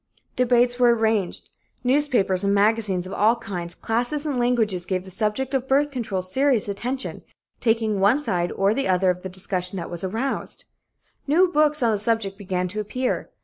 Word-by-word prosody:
Debates 245 0 +2
were 240 -1 +5
arranged. 220 -4 -1 0.3
Newspapers 245 -8 +2
and 200 0 +2
magazines 205 -3 +2
of 185 - -7
all 220 +3 +3
kinds, 180 -7 -3
classes 245 +6 -1
and 280 -4 -1
languages 225 -7 +1
gave 185 -1 -1
the 190 - -12
subject 220 +7 -2
of 265 -1 -1
birth 285 +2 +2
control 220 -8 -3
serious 255 +4 +1
attention, 245 +7 -4 0.4
taking 225 -3 +1
one 205 +7 +4
side 180 -12 -1
or 195 +2 +2
the 275 +3 -1
other 185 0 +3
of 180 0 -6
the 190 - -6
discussion 185 0 -3
that 170 -1 -6
was 175 0 -5
aroused. 225 +8 -3 0.6
New 340 +6 +4
books 300 -3 +2
on 230 - +3
the 210 - 0
subject 215 -2 0
began 185 -3 -3
to 205 +4 -5
appear. 250 +5 -2
220 Hz, 180 wpm, -23 LUFS, 190-250 Hz, 0.6 s, were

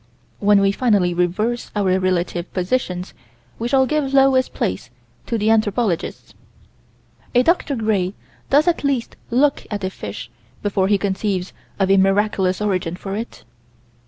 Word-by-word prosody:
When 205 -1 +4
we 195 0 +3
finally 200 -6 +2
reverse 200 +8 -1
our 190 -2 +2
relative 180 -1 -1
positions 180 -2 -2 0.5
we 230 - -1
shall 265 +1 +3
give 275 0 -1
lowest 270 -1 +4
place 100 +7 -3 0.4
to 230 - -1
the 215 +1 +2
anthropologists. 215 -4 0 1.0
A 245 - +5
Dr. 325 -2 +1
Gray 205 -5 0 0.3
does 295 +4 +4
at 345 -3 +1
least 275 -4 -1
look 275 +4 +2
at 205 -2 -4
a 185 - -1
fish - - -8 0.3
before 195 -2 +1
he 205 0 +3
conceives 195 -1 -2 0.3
of 195 -1 +2
a 195 - +5
miraculous 195 -1 +2
origin 185 -4 -1
for 195 +2 -6
it. 225 +3 -6
205 Hz, 145 wpm, -20 LUFS, 185-240 Hz, 1.0 s, A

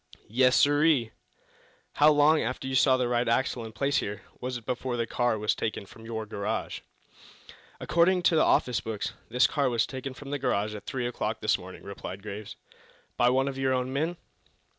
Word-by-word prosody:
"Yes, 125 +3 +4
sirree." 145 -5 +3 0.8
"How 150 +1 +5
long, 150 +1 +4
after 125 +2 -3
you 130 - -3
saw 130 0 +4
the 125 -1 0
right 120 0 0
axle 120 0 0
in 110 - -7
place 140 +6 0
here, 100 -1 -3 0.2
was 125 0 -3
it 120 - -13
before 125 -1 -2
the 115 - 0
car 120 0 0
was 105 0 +1
taken 110 -2 -3
from 110 +3 -14
your 110 -1 -4
garage?" 100 -1 -3 1.0
"According 175 +2 +2
to 170 - +4
the 155 - +4
office 125 -2 +2
books 110 -2 -4 0.2
this 125 +3 +4
car 140 -3 +1
was 115 -2 +1
taken 130 0 -6
from 140 +1 -9
the 145 - -2
garage 105 -5 0
at 105 -1 -9
three 130 -3 -2
o'clock 115 -2 -2
this 110 -2 +1
morning," 95 0 -11
replied 100 -1 -8
Graves. 105 0 -7 0.6
"By 120 - +4
one 130 +2 +2
of 135 -1 -4
your 130 -1 +1
own 130 0 -1
men?" 160 +5 -1
125 Hz, 195 wpm, -28 LUFS, 110-135 Hz, 1.0 s, How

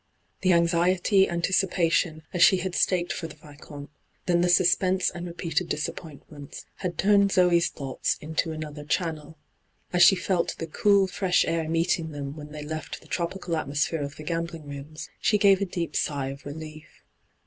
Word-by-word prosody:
The 185 -1 +3
anxiety, 175 +3 +3
anticipation 170 -2 +1
as 175 - -1
she 190 - +7
had 180 0 -3
staked 175 -1 +1
for 165 - -5
the 150 - -12
Vicomte, 145 -1 -12 0.3
then 175 -1 +2
the 175 - +2
suspense 185 +1 +3
and 175 +1 -7
repeated 170 0 -3
disappointments, 150 -2 -6
had 180 -3 -4
turned 200 0 +4
Zoe's 175 -2 +4
thoughts 135 -3 -3
into 160 +2 -2
another 155 -1 -7
channel. 160 -1 -3 0.6
As 180 - +2
she 195 - +8
felt 180 -1 -1
the 165 - -4
cool 200 +4 +3
6resh 185 0 +1
air 165 -1 -1
meeting 165 0 0
them 145 -1 -6
when 150 -1 -10
they 150 -1 -7
left 155 0 -6
the - - -18
tropical 175 0 -3
atmosphere 150 +1 -1
of 140 0 -5
the 155 - -10
gambling 165 -1 -4
rooms, 145 +2 -8
8he 210 - +2
gave 200 -1 +5
a - - +2
deep 175 -3 -4
sigh 140 -2 -1
of 140 +1 -9
relief. 155 +1 -10
165 Hz, 170 wpm, -26 LUFS, 150-180 Hz, 0.6 s, she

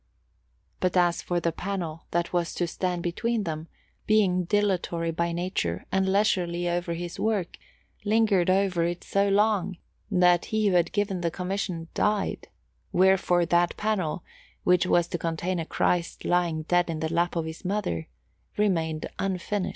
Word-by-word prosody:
But 185 0 +1
as 175 -1 +3
for 175 -1 -1
the 170 0 0
panel 170 -3 -4
that 170 +1 -1
was 175 -1 0
to 175 - 0
stand 175 0 -2
between 225 +6 -1
them, 160 -2 -4
Giovanni - - -35
Antonio, - - -38
being 195 -4 +3
dilatory 180 -4 0
by 170 +1 -1
nature 170 - -2
and 190 0 +2
leisurely 175 -4 +1
over 175 -1 -1
his 175 0 -6
work, 210 -5 -1 0.4
lingered 210 -4 +3
over 185 -2 +2
it 175 +1 -2
so 200 0 +1
long 200 -3 +2 0.3
that 180 -3 +4
he 215 -1 +1
who 185 - +1
had 175 -1 +3
given 200 -3 -1
the 170 - +1
commission 180 -1 -3
died: 210 -1 0 0.4
wherefore 180 -1 +3
that 175 +1 +2
panel, 190 -7 -1 0.4
which 180 0 +3
was 175 -2 +3
to 175 - -3
contain 170 +2 -2
a 165 - -4
Christ 175 -1 0
lying 170 -3 +1
dead 175 +2 +2
in 160 -1 -2
the 160 +1 -2
lap 170 +1 +1
of 165 -1 -1
His 160 +3 -7
Mother, 180 - -2 0.5
remained 165 -7 0
unfinished. 195 +1 -1
175 Hz, 165 wpm, -27 LUFS, 170-195 Hz, 0.5 s, that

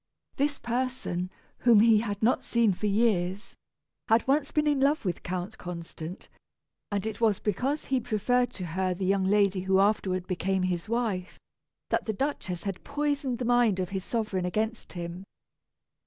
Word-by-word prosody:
This 285 0 +1
person, 240 -7 -2 0.3
whom 235 -4 +6
he 225 -1 +6
had 205 -2 -3
not 240 - +3
seen 230 -4 +2
for 210 +4 -2
years, 200 -2 +1 0.5
had 225 +2 +3
once 280 +1 +2
been 300 0 +1
in 295 -2 +2
love 280 -1 +2
with 175 -3 -2
Count 185 +4 -4
Constant, 170 0 -7 0.6
and 200 0 -1
it 220 0 -4
was 215 -4 +4
because 255 +9 -1
he 265 -1 +1
preferred 245 +2 +1
to 185 - -5
her 185 +2 -1
the 190 +1 -3
young 195 0 +2
lady 200 -1 +3
who 190 +1 +2
afterward 195 -3 +1
became 190 +1 0
his 180 0 -2
wife, 220 -6 -2 0.5
that - - +1
the 220 - -1
Duchess 195 -8 -3
had 195 -2 -4
poisoned 285 -3 -1
the 250 - -3
mind 240 -5 +3
of 180 -1 -1
his 190 -1 -3
sovereign 210 -5 -1
against 215 +5 -2
him. 175 +1 -6
210 Hz, 170 wpm, -28 LUFS, 185-240 Hz, 0.6 s, whom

